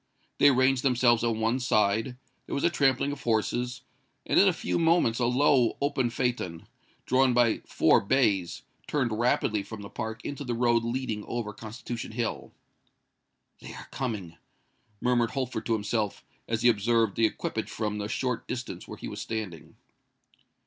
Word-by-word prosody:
They 145 - +7
ranged 130 -1 +3
themselves 120 -3 +3
on 115 -2 0
one 115 +3 +1
side:—there 125 +3 -1
was 140 - -2
a 170 - +3
trampling 140 -2 +2
of 145 - -7
horses; 120 +3 -1 0.4
and - - +3
in 200 - +6
a - - +6
few 175 - -2
moments 165 -9 +3
a 120 - +2
low 125 -1 +3
open 140 -3 0
phaeton, 115 -9 -2 0.4
drawn 130 -1 +3
by 120 -2 +3
four - - +4
bays, 100 -6 +1 0.2
turned 130 -6 0
rapidly 110 -2 +1
from 105 +1 -9
the 100 - -10
park 110 -1 -5
into 145 0 -4
the 120 -3 -2
road 120 -1 +2
leading 115 -3 -3
over 115 -3 -4
Constitution 115 +2 -7
Hill. 115 0 -3 1.1
"They - - -10
are - - -11
coming!" 100 -10 -4 0.6
murmured 120 -2 +2
Holford 130 -3 -3
to 115 - +2
himself, 105 -1 -2 0.2
as 115 0 -1
he 120 - +7
observed 115 -1 +2
the 115 - +4
equipage - - -4
from 105 -1 -3
the 105 - -3
short 125 +2 -2
distance 130 0 -5
where - - -8
he - - -7
was - - -6
standing. 105 -8 -6
120 Hz, 165 wpm, -28 LUFS, 110-130 Hz, 1.1 s, They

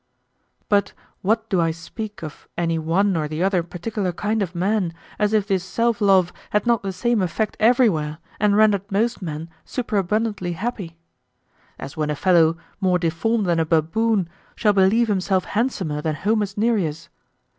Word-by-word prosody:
But 200 -1 +2 0.3
what 220 +3 +1
do 185 -5 +1
I 165 - +2
speak 185 +6 -7
of 155 - -9
any 165 -1 0
one 185 +5 +1
or 155 -2 -1
the 155 +3 -2
other 190 -2 +2
particular 180 +3 -3
kind 210 +5 -1
of 185 -2 -3
men, 185 -1 0 0.2
as 210 0 +2
if 215 -2 +2
this 190 -3 0
self 230 +4 0
love 190 -3 +4 0.2
had 210 - +1
not 235 -2 +2
the 195 - -3
same 215 +4 0
effect 200 +4 -1
everywhere 215 -10 +3 0.2
and 205 0 +3
rendered 205 -2 +3
most 225 +3 0
men 160 -2 -5 0.2
superabundantly 210 -4 -1
happy? 190 -3 -5 0.8
As 135 - -8
when 150 -1 -1
a 150 - 0
fellow, 165 -1 +3 0.2
more 185 -2 +2
deformed 180 +6 0
than 170 -2 +1
a - - +3
baboon, 170 +6 +1 0.3
shall 210 -2 +2
believe 205 +5 +4
himself 190 -2 +1
handsomer 190 - -1
than 155 0 -1
Homer's 205 +2 -1
Nereus. 195 -8 0
195 Hz, 165 wpm, -22 LUFS, 170-215 Hz, 0.8 s, love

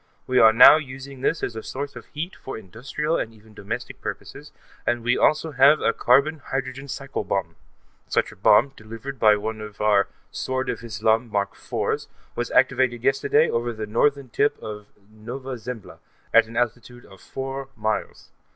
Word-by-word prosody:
We 130 0 +2
are 110 - +8
now 120 +6 +9
using 135 -2 -8
this 160 - 0
as 115 - -2
a 110 - -5
source 140 +4 -6
of - - -10
heat 165 +5 -6
for 135 - -7
industrial 125 - -3
and 110 - -3
even 110 0 -19
domestic 100 -2 -6
purposes, - - -7 0.3
and 120 -1 -1
we 120 +1 +2
also 155 +1 +2
have 140 +2 +6
a 115 - +1
carbon 140 +5 +3
hydrogen 135 0 -4
cycle 135 0 -4
bomb. 90 -4 -2 0.5
Such - - 0
a - - -14
bomb, 105 +6 +5
delivered 115 +5 -8
by 105 -1 +6
one 110 +1 -4
of 105 -1 -9
our 105 -2 +3 0.2
Sword 130 0 -2
of - - -7
Islam 110 +2 0
Mark 100 -1 -1
IV's, - - -3 0.3
was - - -2
activated 120 -2 +2
yesterday 135 +1 +3
over 120 +1 -1
the 110 -1 -5
Northern 140 +5 +1
tip 145 +5 +1
of 105 -1 -8 0.2
Nova 125 +5 -7
Zembla, 115 -1 -8 0.3
at 115 -1 +6
an 115 - -8
altitude 120 +1 -3
of 95 -2 -16
four 135 0 -6
miles. 110 0 -3
120 Hz, 175 wpm, -24 LUFS, 110-135 Hz, 0.5 s, now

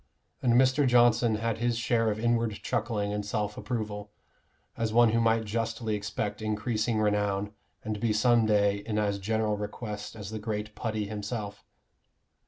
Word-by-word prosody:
And 120 -2 +3
Mr. 130 +3 +4
Johnson 120 -2 +4
had 115 0 -2
his 120 0 +1
share 115 -1 +1
of 105 0 -2
inward 115 -1 +1
chuckling 105 -3 -1
and 105 0 -2
self 105 0 -2
approval, 105 -3 -4 0.6
as 115 -2 -1
one 120 +1 +5
who 115 +1 +2
might 115 0 +2
justly 115 +1 -2
expect 105 0 -3
increasing 110 +1 -1
renown, 105 -1 0 0.3
and 110 -1 -3
be 115 +1 +1
some 115 +1 +3
day 100 -1 +3
in 105 +1 -4
as 100 -1 0
general 110 +1 0
request 105 0 -6
as 105 -2 -7
the 110 - -4
great 105 0 -4
Putty 110 -1 -2
himself. 105 0 -5
110 Hz, 160 wpm, -28 LUFS, 105-115 Hz, 0.6 s, one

